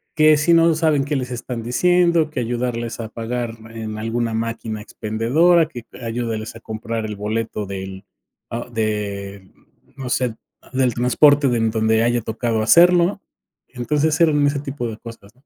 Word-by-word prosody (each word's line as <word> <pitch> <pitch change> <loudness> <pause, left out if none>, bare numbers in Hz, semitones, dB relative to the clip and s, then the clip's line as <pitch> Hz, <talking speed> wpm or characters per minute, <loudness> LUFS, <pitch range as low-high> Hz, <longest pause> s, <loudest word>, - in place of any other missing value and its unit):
que 155 -1 +5
si 150 +3 +3
no 165 0 +5
saben 155 -3 +2
qué 145 +1 -2
les 125 -1 -4
están 120 0 -5
diciendo, 170 +5 +2
que 150 - -4
ayudarles 120 -1 -3
a 110 -2 -5
pagar 115 0 -4 0.2
en 110 -1 -6
alguna 115 +1 -2
máquina 115 -1 -3
expendedora, 135 +12 +2
que 120 -7 -9 0.2
ayúdales 115 -2 -4
a - - -10
comprar 110 0 -4
el 105 -1 -5
boleto 110 +1 -3
del 95 0 -7 0.7
de 100 -3 -3 0.5
no 130 -2 -5
sé, 125 -2 0 0.4
del 130 -2 +2
transporte 140 +4 +4
de 120 - +1
en 115 -1 +1
donde 110 0 +2
haya 120 0 +1
tocado 115 0 -2
hacerlo. 175 - +5 0.5
Entonces 145 +5 0
eran 150 -3 +4
ese 140 0 0
tipo 135 -3 -4
de 110 - -6
cosas. 115 -3 -12
120 Hz, 155 wpm, -20 LUFS, 110-145 Hz, 0.7 s, que